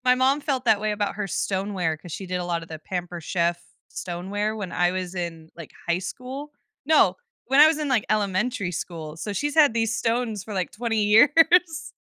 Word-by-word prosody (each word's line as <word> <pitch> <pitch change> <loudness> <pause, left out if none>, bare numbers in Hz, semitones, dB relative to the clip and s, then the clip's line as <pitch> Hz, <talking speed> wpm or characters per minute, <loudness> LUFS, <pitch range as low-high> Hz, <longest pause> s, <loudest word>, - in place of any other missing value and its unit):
My 250 0 +5
mom 265 +3 +2
felt 265 -4 -2
that 215 -3 +4
way 215 0 0
about 205 -1 -2
her 210 -1 -3
stoneware, 190 -4 -1
'cause 170 +1 -11
she 190 - -6
did 180 0 -2
a - - -3
lot 170 -1 -2
of 165 - -11
the 160 -1 -7
Pampered 175 0 -5
Chef 170 -1 0 0.3
stoneware 195 +5 -3
when 200 -4 -5
I 175 +1 +2
was 185 0 -4
in, 165 -3 -5
like, 165 -3 -10 0.2
high 170 +1 +2
school? 260 +9 -7 0.3
No! 315 +2 +4 0.3
When 270 +3 +4
I 305 - +10
was 315 -1 +2
in, 300 - -2
like, 245 -6 +2
elementary 200 0 0
school, 160 -2 -6
so 165 +6 -5
she's 290 +7 -2
had 300 -5 +6
these 230 0 0
stones 230 -3 -1
for, 215 - -8
like, 185 -2 -2
20 225 -1 -1
years. 320 - +4
205 Hz, 210 wpm, -24 LUFS, 180-250 Hz, 0.3 s, I